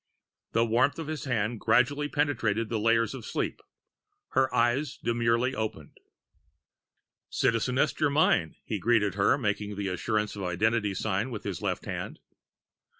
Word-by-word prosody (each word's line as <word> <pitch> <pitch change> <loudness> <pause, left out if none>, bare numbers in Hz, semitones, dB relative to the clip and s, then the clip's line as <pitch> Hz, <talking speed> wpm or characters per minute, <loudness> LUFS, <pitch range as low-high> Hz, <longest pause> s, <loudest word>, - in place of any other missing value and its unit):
The 115 +1 +3
warmth 120 +5 +2
of 165 - -4
his 155 0 -5
hand 115 -3 -1
gradually 145 +7 +2
penetrated 115 -8 0
the 115 - -1
layers 115 +1 +2
of 130 -4 -7
sleep. - - -3 0.7
Her 130 0 +2
eyes 130 +5 +1
demurely 115 +2 +1
opened. 110 -1 -5 1.3
"Citizeness 125 +3 +1
Germyn," 145 - +2
he 105 - -3
greeted 105 -1 +2
her, 100 +7 +3
making 105 -4 -2
the 100 -1 -2
assurance 105 +3 -1
of 100 - -6
identity 100 +3 0
sign 105 +4 -1
with 110 -4 -6
his 100 -5 -4
left - - -2
hand. - - -5
115 Hz, 140 wpm, -28 LUFS, 105-130 Hz, 1.3 s, The